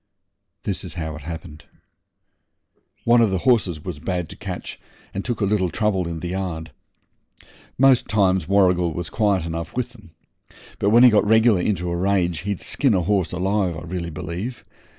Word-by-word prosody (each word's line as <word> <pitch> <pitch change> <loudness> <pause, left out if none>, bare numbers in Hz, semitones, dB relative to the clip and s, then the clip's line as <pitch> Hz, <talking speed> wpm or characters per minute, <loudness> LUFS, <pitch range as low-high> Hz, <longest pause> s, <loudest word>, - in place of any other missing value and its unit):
This - - -3
is - - -7
how 80 -2 -4
it 75 - -9
happened. 80 -1 -8 1.4
One 120 0 +5
of 115 - +4
the 95 - 0
horses 100 - +2
was 75 - -5
bad 90 0 -3
to - - -9
catch, - - -7 0.3
and 100 - -3
took 120 -3 -3
a - - +3
little 95 -2 +1
trouble 95 -3 0
in 85 -1 -5
the 90 - -4
yard. 90 -4 -4 1.1
Most 130 -1 +5
times 95 -5 +2
Warrigal 90 -3 +3
was 85 +1 -4
quiet 100 -6 +1
enough 85 +5 -5
with 125 -1 -3
'em, 105 -7 -16 0.7
but 100 - +2
when 120 +3 +6
he 125 - +8
got 105 -1 +3
regular 110 -3 +5
into 90 -3 -1
a - - -1
rage 90 -2 +1
he'd 100 +2 -3
skin 135 -7 +1
a 90 - +2
horse 90 -2 0
alive, 95 -1 0
I - - -7
really 85 0 -4
believe. 90 +8 -6
95 Hz, 180 wpm, -22 LUFS, 85-105 Hz, 1.4 s, he